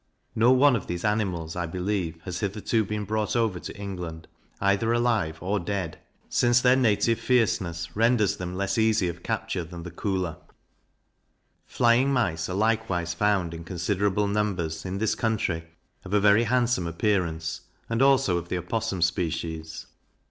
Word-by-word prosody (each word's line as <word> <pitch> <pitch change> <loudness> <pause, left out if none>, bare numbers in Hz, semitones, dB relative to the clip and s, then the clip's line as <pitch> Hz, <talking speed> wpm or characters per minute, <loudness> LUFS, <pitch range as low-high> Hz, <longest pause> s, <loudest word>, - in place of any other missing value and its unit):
No 115 +3 +4
one 130 +1 +5
of 110 - -4
these 85 +3 -3
animals, 95 -7 -1
I 90 -1 -2
believe, 90 -1 -2
has 90 -2 -4
hitherto 105 +2 0
been 105 +1 -3
brought 110 +2 -1
over 110 -6 +1
to - - -8
England, 90 -5 -6 0.3
either 100 +3 +2
alive 115 -9 +1
or 100 +3 0
dead, 95 -2 -3 0.3
since 120 0 +3
their 125 0 +5
native 115 -2 +2
fierceness 85 -9 0
renders 115 -2 +3
them 90 0 -5
less 100 +3 -1
easy 110 -4 +3
of 85 +1 -7
capture 85 - -2
than 85 +1 -9
the 90 - -7
Koolah. 90 -2 -2 1.3
Flying 120 +3 +3
Mice 100 -12 0
are 90 - -3
likewise 105 -5 0
found, 95 -2 +1
in 85 0 -7
considerable 95 +3 0
numbers, 100 -6 -1
in 95 +1 -3
this 110 +1 +1
country, 95 -7 -1 0.4
of 95 +2 -2
a - - +5
very 105 +3 +5
handsome 120 -6 +1
appearance, 85 -3 -1 0.3
and 115 +2 -1
also 135 -10 +4
of 85 0 -10
the 90 - -1
Opossum 95 +1 -2
species. 80 -2 -2
100 Hz, 155 wpm, -26 LUFS, 85-110 Hz, 1.3 s, one